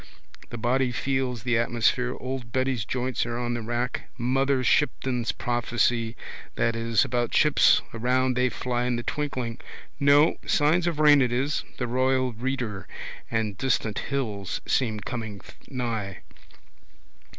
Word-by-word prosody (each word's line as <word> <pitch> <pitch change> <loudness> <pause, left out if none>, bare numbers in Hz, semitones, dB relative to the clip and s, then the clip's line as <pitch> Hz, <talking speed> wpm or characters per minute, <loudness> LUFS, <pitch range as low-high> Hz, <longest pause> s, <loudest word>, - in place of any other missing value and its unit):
The 120 - -6
body 125 +2 +1
feels 130 -2 -1
the 120 -2 +2
atmosphere. 120 +2 +1
Old 130 -2 -5
Betty's 130 -3 0
joints 125 +2 -1
are 120 0 -3
on 120 0 -2
the 120 - -3
rack. 120 +2 -3
Mother 135 +2 +1
Shipton's 125 -2 +1
prophecy 120 -1 0 0.4
that 115 -1 +1
is 115 -1 +2
about 120 -1 -1
ships 150 -1 +5
around 125 +2 +1
they 125 0 +2
fly 125 0 -2
in 125 -1 0
the 120 - -3
twinkling. 130 -6 -3 0.4
No. 145 +3 +5
Signs 165 +4 +2
of 170 -3 -1
rain 150 -2 +7
it 125 -2 +2
is. 135 +4 0
The 125 - -1
royal 130 +1 +1
reader. 120 -4 -3 0.4
And 110 -3 -1
distant 120 -5 0
hills 110 -9 -3
seem 110 -5 0
coming 110 -3 -5 0.3
nigh. 115 -7 -4
125 Hz, 140 wpm, -26 LUFS, 115-130 Hz, 0.4 s, rain